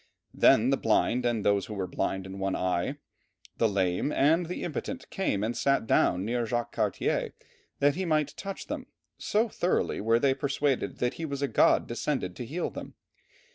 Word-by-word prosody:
Then - - +5
the - - +3
blind, 125 0 +2
and 115 -3 -1
those 100 -1 +2
who 105 - -6
were 95 -2 -2
blind 95 +1 -2
in 95 +1 -8
one 95 0 -1
eye, 90 +9 -1 0.6
the 115 - +3
lame, 95 +6 0
and 160 +5 +3
the 180 - -4
impotent 255 - -4
came 105 - -1
and 115 +2 -1
sat 140 -4 +1
down 90 -3 +2
near 120 +1 -1
Jacques 120 +1 -2
Cartier, - - -1 0.4
that 145 0 +3
he 190 - -3
might 155 -4 0
touch 195 0 -6
them, - - -5 0.3
so 220 +3 +1
thoroughly 180 -4 0
were 115 +2 +3
they 135 +2 +3
persuaded 140 0 -1
that 125 0 0
he - - -1
was 140 -2 -4
a - - +2
god - - +4
descended 120 -6 -2
to 120 - -6
heal 170 +7 -3
them. - - -8
125 Hz, 185 wpm, -28 LUFS, 100-150 Hz, 0.6 s, Then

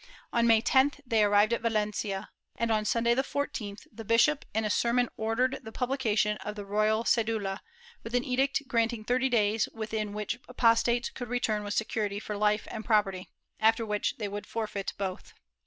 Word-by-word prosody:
On 235 0 +3
May 225 -1 +5
10th 275 +3 +3
they 225 -3 +3
arrived 205 +2 +4
at 235 - -1
Valencia 210 -3 -2 0.2
and, 230 -1 -1
on 215 -1 +1
Sunday 235 +2 +2
the 260 - +2
14th, 230 -7 -4
the 225 +1 -9
bishop 235 +7 +3
in 220 +1 0
a - - 0
sermon 240 +2 +2
ordered 240 +4 0
the 220 - -9
publication 225 -5 0
of 210 -1 -6
the 205 -1 -6
royal 215 +2 +1
cedula, 220 -5 0 0.4
with 230 +2 -5
an 245 - +2
edict 265 +2 0
granting 230 -2 0
thirty 255 +3 +1
days 220 -2 +2
within 215 -2 -3
which 210 +3 -3
apostates 235 0 +2
could 245 -3 -7
return 220 -4 0
with 205 0 -3
security 210 -2 -1
for 210 0 -5
life 210 +1 +1
and 220 - -5
property, 200 -5 +1 0.3
after 225 +1 +3
which 210 -1 -1
they 210 - -3
would 205 +1 -6
forfeit 215 -3 -3
both. 190 -2 -5
220 Hz, 180 wpm, -29 LUFS, 210-235 Hz, 0.4 s, May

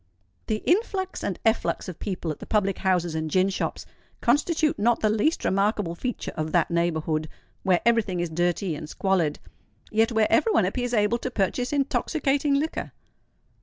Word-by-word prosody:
The 215 -1 -2
influx 380 0 0
and 190 - -2
efflux 225 -2 +1
of 180 - -7
people 180 -5 -3
at 150 - -7
the - - -9
public 195 -3 +1
houses 180 -3 +1
and 160 0 -2
gin 185 +4 +3
shops 190 - -3 0.3
constitute 300 +2 +2
not 235 +3 +2
the 215 - +3
least 225 +10 +1
remarkable 195 -2 +1
feature 245 +8 -4
of 155 0 -3
that 175 -1 +2
neighbourhood, 160 -2 0 0.3
where 185 -2 +2
every 235 -1 +5
thing 185 -4 -4
is 175 - 0
dirty 175 +1 0
and 150 0 -7
squalid, 180 -6 0 0.5
yet 225 +2 +3
where 220 -1 +3
every 455 - +4
one 330 - +3
appears 245 +5 -1
able 210 +2 +2
to 255 - -3
purchase 245 +3 -1
intoxicating 285 0 +1
liquor! 305 +3 -2
205 Hz, 170 wpm, -25 LUFS, 175-245 Hz, 0.5 s, every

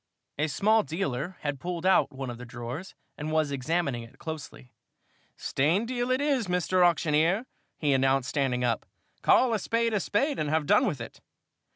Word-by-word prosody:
A 150 - +2
small 215 +9 +3
dealer 165 -2 -3
had 145 -2 -3
pulled 175 +1 -4
out 185 -5 +4
one 135 -2 -5
of 120 - -9
the - - -7
drawers 125 +8 -7 0.2
and 150 +1 -3
was 155 -2 +1
examining 140 -1 -1
it 115 0 -13
closely. 155 -5 -8 0.7
"Stained 175 - +1
deal 245 -1 -1
it 255 0 +2
is, 280 -7 +1
Mr. 180 +1 +2
Auctioneer," 170 +5 +3 0.3
he 145 -3 +1
announced, 135 0 +2
standing 130 -4 0
up. 120 -2 0 0.3
"Call 250 -2 +4
a 220 - +1
spade 230 +3 0
a 210 - +2
spade 275 +10 0
and 150 - -1
have 155 0 +1
done 255 - +4
with 150 - -2
it!" 115 - -9
160 Hz, 180 wpm, -28 LUFS, 135-195 Hz, 0.7 s, out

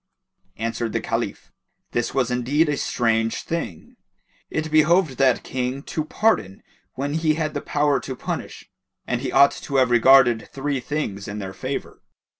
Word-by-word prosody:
Answered 115 0 -3
the - - +1
Caliph; - - -3 0.4
"This 120 - -1
was 125 -2 0
indeed 135 +6 +2
a 145 - +1
strange 115 -3 0
thing: 160 - -5 0.5
it 155 0 -3
behoved 155 -2 +3
that 130 -3 +3
King 130 +2 -3
to 155 - -3
pardon 155 - 0 0.3
when 140 +2 -2
he 160 -1 +1
had 155 -1 -2
the 145 - -3
power 145 -1 +1
to 130 - -6
punish; - - -6 0.4
and 125 -1 -2
he 130 - -3
ought 140 0 +6
to 140 - -7
have 130 -2 +4
regarded 120 -1 +5
three 140 0 -2
things 120 -7 -4
in 100 +1 -5
their 95 -2 -5
favour. 130 +7 -5
135 Hz, 160 wpm, -23 LUFS, 120-150 Hz, 0.5 s, ought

